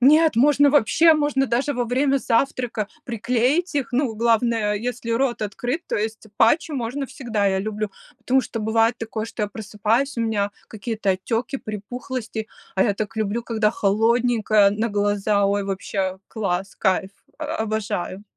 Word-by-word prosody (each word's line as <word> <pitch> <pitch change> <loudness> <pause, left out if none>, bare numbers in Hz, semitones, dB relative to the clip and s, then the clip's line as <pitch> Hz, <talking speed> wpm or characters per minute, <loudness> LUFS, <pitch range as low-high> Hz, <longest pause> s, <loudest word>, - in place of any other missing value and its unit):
Нет! 305 +2 +5
Можно 285 +3 +5
вообще, 295 +5 +5
можно 290 -3 +1
даже 255 +5 0
во 245 -2 -1
время 270 +3 +2
завтрака 240 -3 0 0.2
приклеить 250 - 0
их. 275 -4 0
Ну, 245 -3 +1
главное, 225 -1 +2
если 235 +2 -4
рот 240 0 0
открыт, 245 - -3
то - - -1
есть 220 +1 -3
патчи 300 +8 +3
можно 265 +1 -3
всегда, 235 -6 -2
я 190 -1 +2
люблю, 210 +1 -3 0.3
потому 265 +1 +2
что 230 -3 -5
бывает 225 +2 +2
такое, 220 -1 -4
что 225 -1 -5
я 210 - 0
просыпаюсь, 220 +6 -1
у - - -1
меня 210 -3 0 0.2
какие-то 220 -1 -2
отеки, 225 +8 -1
припухлости, 220 +1 -5 0.3
а 190 - +3
я 205 - +1
так 215 +2 -4
люблю, 220 +2 -1
когда 220 -2 +1
холодненькое 220 0 +3
на 220 +3 -1
глаза. 205 0 +1
Ой, 200 0 0
вообще 190 -1 -2
класс, 195 -3 -3
кайф, 190 -1 +1 0.3
о 310 - -4
обожаю! 210 -3 -3
225 Hz, 155 wpm, -23 LUFS, 210-250 Hz, 0.3 s, Нет